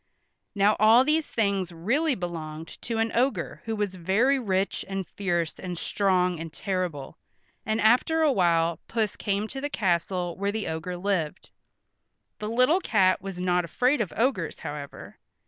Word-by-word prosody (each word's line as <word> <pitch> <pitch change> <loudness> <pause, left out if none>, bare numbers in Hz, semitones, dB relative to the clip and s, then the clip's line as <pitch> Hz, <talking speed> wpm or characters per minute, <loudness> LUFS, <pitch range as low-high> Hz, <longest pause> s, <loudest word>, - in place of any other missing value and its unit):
Now 205 +1 +4
all 225 +4 +7
these 305 +2 +1
things 200 -5 0
really 255 - 0
belonged 165 -3 -6
to 230 -2 -3
an 225 0 +1
ogre 255 +4 0
who 225 0 -2
was 205 -3 -2
very 210 +10 +2
rich 195 -5 -1
and 195 -1 -3
fierce 175 -5 -2
and 180 -2 -5
strong 180 -2 +1
and 165 -1 -6
terrible, 180 -7 -4 0.5
and 220 +1 0
after 255 +9 +3
awhile 170 - +2
Puss 220 -3 -1
came 205 +1 -1
to 270 - -6
the 290 - -2
castle 180 -5 -1
where 200 0 0
the 220 0 -3
ogre 160 +3 -4
lived. 180 -3 -2 0.9
The 210 - -4
little 255 +10 +3
cat 185 - +2
was 195 -2 -6
not 180 -1 +1
afraid 250 - +1
of 200 - -2
ogres, 220 - 0
however. 145 -2 -8
195 Hz, 155 wpm, -26 LUFS, 175-225 Hz, 0.9 s, all